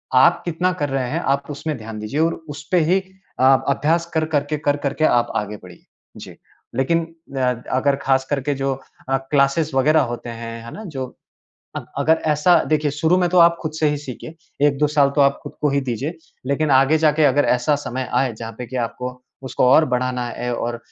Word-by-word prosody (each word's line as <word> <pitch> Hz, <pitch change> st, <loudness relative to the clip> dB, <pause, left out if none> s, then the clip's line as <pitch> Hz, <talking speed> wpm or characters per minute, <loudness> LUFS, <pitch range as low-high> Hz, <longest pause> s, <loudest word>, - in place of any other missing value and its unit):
आप 170 Hz, +7 st, +5 dB
कितना 175 Hz, +2 st, 0 dB
कर 145 Hz, -, 0 dB
रहे 135 Hz, -2 st, -1 dB
हैं -, -, -1 dB
आप 140 Hz, +2 st, -1 dB
उसमें 145 Hz, +1 st, -4 dB
ध्यान 110 Hz, -1 st, -8 dB
दीजिए 110 Hz, +8 st, -3 dB
और 165 Hz, +1 st, +2 dB, 0.2 s
उसपे 155 Hz, +5 st, -1 dB
ही 190 Hz, +1 st, +3 dB, 0.4 s
आप 135 Hz, 0 st, +5 dB
अभ्यास 160 Hz, +5 st, +1 dB
कर-कर 155 Hz, -2 st, +1 dB
के 150 Hz, -, -1 dB
कर-कर 145 Hz, -2 st, -1 dB
के 155 Hz, -, +1 dB
आप 120 Hz, -3 st, +2 dB
आगे 105 Hz, 0 st, -3 dB
बढ़िए। 90 Hz, -2 st, -14 dB, 0.3 s
जी। -, -, -10 dB, 0.4 s
लेकिन 165 Hz, +6 st, +1 dB, 0.3 s
अ, 125 Hz, -2 st, 0 dB
अगर 140 Hz, +2 st, +2 dB
ख़ास 130 Hz, -1 st, +2 dB
करके 145 Hz, 0 st, -1 dB
जो 135 Hz, 0 st, -1 dB, 0.4 s
अ, 135 Hz, -, +3 dB
क्लासेज़ 140 Hz, +2 st, +1 dB
वग़ैरह 150 Hz, +4 st, +4 dB
होते 120 Hz, -, -7 dB
हैं, 115 Hz, 0 st, -7 dB
है 115 Hz, -, -8 dB
ना? 220 Hz, -, -8 dB
जो 135 Hz, -6 st, -5 dB, 0.7 s
अ, -, -, -3 dB, 0.2 s
अगर 160 Hz, +1 st, +2 dB
ऐसा 170 Hz, +4 st, +4 dB
देखिए 150 Hz, -1 st, +1 dB
शुरू 160 Hz, +5 st, +2 dB
में 180 Hz, -1 st, +2 dB
तो 180 Hz, -, +1 dB
आप 170 Hz, 0 st, +6 dB
खुद 155 Hz, -2 st, -3 dB
से 155 Hz, -, +3 dB
ही 145 Hz, -, -1 dB
सीखिए। 145 Hz, +3 st, -9 dB, 0.3 s
1-2 145 Hz, +1 st, +1 dB
साल 145 Hz, -2 st, +3 dB
तो 145 Hz, -, +4 dB
आप 140 Hz, 0 st, +3 dB
खुद -, -, -8 dB
को 150 Hz, -, +2 dB
ही 140 Hz, 0 st, +1 dB
दीजिए। 135 Hz, +6 st, -4 dB, 0.3 s
लेकिन 145 Hz, +1 st, +1 dB
आगे 135 Hz, +4 st, +5 dB
जाके 155 Hz, 0 st, +3 dB
अगर 145 Hz, +1 st, +3 dB
ऐसा 125 Hz, +4 st, +1 dB
समय 130 Hz, +1 st, -4 dB
आए 130 Hz, -4 st, +1 dB
जहाँ 115 Hz, +1 st, -7 dB
पे 125 Hz, -, -5 dB
कि 130 Hz, -, -8 dB
आपको 125 Hz, +1 st, -8 dB, 0.2 s
उसको 130 Hz, -, 0 dB
और 155 Hz, -, +6 dB
बढ़ाना 125 Hz, 0 st, -1 dB
है 120 Hz, 0 st, -4 dB
और 120 Hz, 0 st, -3 dB
140 Hz, 205 wpm, -21 LUFS, 130-155 Hz, 0.7 s, आप